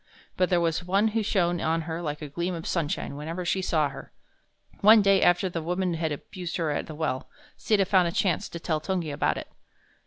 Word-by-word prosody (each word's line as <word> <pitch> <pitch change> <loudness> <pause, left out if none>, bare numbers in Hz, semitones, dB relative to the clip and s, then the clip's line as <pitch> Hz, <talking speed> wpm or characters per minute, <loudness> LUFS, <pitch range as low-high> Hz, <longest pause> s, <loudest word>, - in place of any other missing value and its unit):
But 185 - +1
there 175 - +3
was 165 0 0
one 195 +5 +2
who 220 +1 0
shone 175 -5 +1
on 165 +1 +1
her 165 +1 -4
like 150 -2 -4
a - - -4
gleam 170 +5 -3
of 165 - -7
sunshine 155 -4 -2
whenever 165 +5 -5
she 190 +2 0
saw 155 -5 +1
her. 135 - -10 0.7
One 215 +1 +7
day 195 -1 +4
after 175 +2 +4
the 170 -2 -4
woman 180 +2 -1
had 160 -1 -1
abused 175 +4 -5
her 165 -3 0
at 145 - -2
the 155 - -8
well, 150 -4 -2 0.3
Sita 205 -3 +2
found 185 -2 +3
a - - -1
chance 180 -1 0
to 170 - -7
tell 155 -2 -1
Tungi 175 -3 -2
about - - 0
it. - - -7
170 Hz, 220 wpm, -27 LUFS, 160-185 Hz, 0.7 s, One